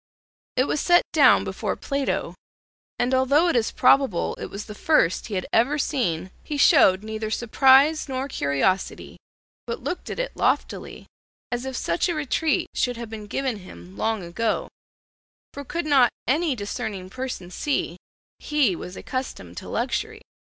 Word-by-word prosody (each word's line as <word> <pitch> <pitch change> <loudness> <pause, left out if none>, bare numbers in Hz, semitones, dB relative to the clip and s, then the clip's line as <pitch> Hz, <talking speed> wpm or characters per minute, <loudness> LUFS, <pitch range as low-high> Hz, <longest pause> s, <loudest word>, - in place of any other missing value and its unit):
It 255 - +3
was 285 - -1
set 350 0 +5
down - - +6
before - - -3
Plato, 275 -1 -2 0.6
and 245 +2 0
although 280 +6 +3
it 335 - 0
is 230 -2 +2
probable 260 -7 +3
it - - -5
was 200 +1 -7
the 210 - -8
first 210 - +2
he 215 - -4
had 185 - -2
ever 255 +6 +3
seen, 190 - -1
he 295 - -4
showed 220 - +5
neither 220 0 -4
surprise 270 +7 +4
nor 265 +1 -2
curiosity, 165 - -1 0.5
but 465 - -5
looked 360 - -4
at - - -5
it - - -3
loftily - - -1 0.5
as 245 +1 -2
if 265 -1 -4
such 170 - 0
a 345 - -1
retreat 305 +1 0
should 245 -2 -1
have 230 -2 -7
been 215 -2 -7
given 260 +1 -2
him 95 - -13
long 220 - -1
ago, 215 +6 -2 0.8
for 285 - -7
could 340 +4 -4
not 275 -5 +5 0.2
any 300 +2 +1
discerning 205 -3 -5
person 255 -8 -5
see 185 - -2 0.4
he 285 -11 +1
was 180 +2 -8
accustomed 255 0 -5
to - - -7
luxury? 440 +1 -2
250 Hz, 160 wpm, -24 LUFS, 205-285 Hz, 0.8 s, down